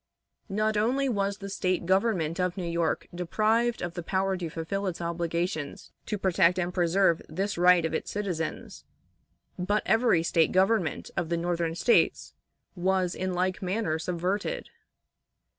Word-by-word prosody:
Not 215 Hz, +2 st, 0 dB
only 255 Hz, +6 st, +1 dB
was 200 Hz, -4 st, 0 dB
the 200 Hz, -, -7 dB
State 185 Hz, -2 st, -1 dB
government 185 Hz, -4 st, +1 dB
of 180 Hz, 0 st, 0 dB
New 185 Hz, -, -3 dB
York 170 Hz, -1 st, -1 dB
deprived 215 Hz, +7 st, +1 dB
of 175 Hz, -1 st, -3 dB
the 175 Hz, -, -4 dB
power 190 Hz, +2 st, 0 dB
to 175 Hz, -3 st, -4 dB
fulfill 190 Hz, +5 st, -3 dB
its 180 Hz, -, -3 dB
obligations 170 Hz, -2 st, -3 dB, 0.2 s
to 210 Hz, -, -1 dB
protect 180 Hz, -2 st, +3 dB
and 180 Hz, 0 st, -1 dB
preserve 175 Hz, -1 st, +2 dB
this 195 Hz, +6 st, -2 dB
right 180 Hz, -1 st, +5 dB
of 160 Hz, -, -2 dB
its -, -, -2 dB
citizens, 185 Hz, -6 st, -4 dB, 0.8 s
but 205 Hz, +4 st, 0 dB
every 225 Hz, -8 st, +3 dB
State 165 Hz, -1 st, +2 dB
government 190 Hz, -2 st, +1 dB
of 175 Hz, -2 st, -2 dB
the 170 Hz, -, 0 dB
Northern 170 Hz, -1 st, -1 dB
States 235 Hz, +7 st, +2 dB, 0.4 s
was 185 Hz, 0 st, +1 dB
in 185 Hz, -1 st, -3 dB
like 185 Hz, +2 st, 0 dB
manner 185 Hz, -4 st, -1 dB
subverted. 185 Hz, -, -2 dB
185 Hz, 150 wpm, -28 LUFS, 170-200 Hz, 0.8 s, right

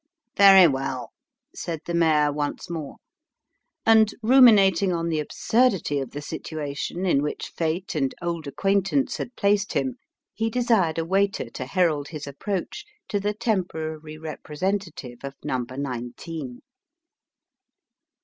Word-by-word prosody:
" -, -, -65 dB
Very 195 Hz, -3 st, +8 dB
well," 135 Hz, -3 st, -3 dB, 0.4 s
said 165 Hz, -3 st, -5 dB
the 170 Hz, -, -4 dB
mayor 155 Hz, -3 st, +3 dB
once 145 Hz, +3 st, -4 dB
more; 160 Hz, -4 st, -5 dB, 0.9 s
and, 220 Hz, -1 st, +6 dB
ruminating 205 Hz, -7 st, +6 dB
on 170 Hz, -1 st, -1 dB
the 160 Hz, -2 st, 0 dB
absurdity 195 Hz, -, +1 dB
of 135 Hz, -3 st, -4 dB
the 145 Hz, +3 st, -7 dB
situation 155 Hz, +3 st, -4 dB
in 140 Hz, -7 st, +3 dB
which 150 Hz, -, -4 dB
fate 170 Hz, +4 st, -2 dB
and 135 Hz, -5 st, -1 dB
old 170 Hz, -3 st, -3 dB
acquaintance 195 Hz, -, 0 dB
had 240 Hz, -, -6 dB
placed 205 Hz, +1 st, +1 dB
him, 260 Hz, -1 st, -1 dB, 0.4 s
he 225 Hz, +1 st, -1 dB
desired 225 Hz, -9 st, +1 dB
a 165 Hz, -, -1 dB
waiter 195 Hz, -, 0 dB
to 130 Hz, -, -6 dB
herald 155 Hz, -4 st, +1 dB
his 150 Hz, -1 st, -7 dB
approach 190 Hz, -, -4 dB, 0.3 s
to 205 Hz, -, 0 dB
the 205 Hz, +1 st, -2 dB
temporary 160 Hz, -8 st, -3 dB
representative 155 Hz, -3 st, -4 dB
of 140 Hz, 0 st, -6 dB
number 130 Hz, -3 st, -3 dB
nineteen. 130 Hz, +1 st, -6 dB
165 Hz, 130 wpm, -24 LUFS, 145-200 Hz, 0.9 s, Very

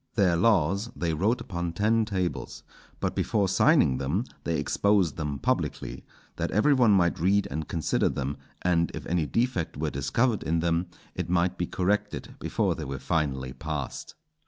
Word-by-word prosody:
Their 95 Hz, -6 st, +3 dB
laws 100 Hz, +2 st, +2 dB
they 85 Hz, -2 st, -1 dB
wrote 105 Hz, +10 st, +1 dB
upon 85 Hz, -2 st, -4 dB
ten 110 Hz, +4 st, +2 dB
tables, 95 Hz, -4 st, -3 dB, 0.4 s
but -, -, -1 dB
before 100 Hz, -3 st, +1 dB
signing 95 Hz, -, +4 dB
them 75 Hz, -, 0 dB, 0.2 s
they 85 Hz, -1 st, 0 dB
exposed 100 Hz, -6 st, +2 dB
them 75 Hz, -3 st, -3 dB
publicly, -, -, -2 dB, 0.3 s
that -, -, -1 dB
every 125 Hz, +9 st, +3 dB
one 125 Hz, -4 st, +4 dB
might 90 Hz, -5 st, +3 dB
read 100 Hz, +4 st, +2 dB
and 80 Hz, +2 st, -3 dB
consider 80 Hz, -3 st, +1 dB
them, 70 Hz, +1 st, -3 dB, 0.3 s
and 85 Hz, -2 st, +2 dB
if -, -, -7 dB
any 85 Hz, -3 st, 0 dB
defect 115 Hz, -, -1 dB
were 75 Hz, 0 st, -1 dB
discovered 100 Hz, -, +1 dB
in 85 Hz, +1 st, 0 dB
them, 85 Hz, +1 st, 0 dB, 0.3 s
it -, -, -4 dB
might 90 Hz, 0 st, +2 dB
be 85 Hz, -2 st, -2 dB
corrected 100 Hz, +3 st, -1 dB
before -, -, 0 dB
they -, -, -6 dB
were 65 Hz, 0 st, -4 dB
finally 65 Hz, -3 st, -1 dB
passed. 75 Hz, -3 st, -5 dB
85 Hz, 165 wpm, -27 LUFS, 75-100 Hz, 0.4 s, signing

